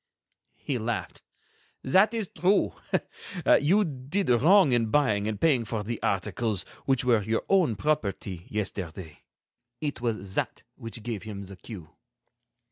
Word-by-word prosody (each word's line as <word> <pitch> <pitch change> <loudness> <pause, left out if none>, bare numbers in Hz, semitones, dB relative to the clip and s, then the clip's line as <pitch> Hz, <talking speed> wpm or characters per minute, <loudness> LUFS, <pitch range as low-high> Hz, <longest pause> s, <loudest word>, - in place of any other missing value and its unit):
He 130 -4 -3
laughed. 115 +1 -3 0.6
"That 190 +11 +4
is 225 -4 -2
true. 190 +3 +2 0.7
You 190 +9 +5
did 145 +4 -1
wrong 155 - +6
in 120 -2 +2
buying 110 -6 +2
and 105 -2 -3
paying 135 -5 +3
for 110 -1 -3
the 115 +1 -4
articles 100 +1 -1 0.2
which 135 -2 +1
were 120 -4 +4
your 110 +2 -1
own 175 - +3
property, 100 - -2
yesterday. 95 -6 -4 0.6
It 145 -5 -3
was 110 -5 -2
that - - -2
which 115 0 -8
gave 115 -4 -4
him 105 -2 -7
the 95 0 -9
cue." 90 -4 -10
115 Hz, 135 wpm, -27 LUFS, 105-145 Hz, 0.7 s, wrong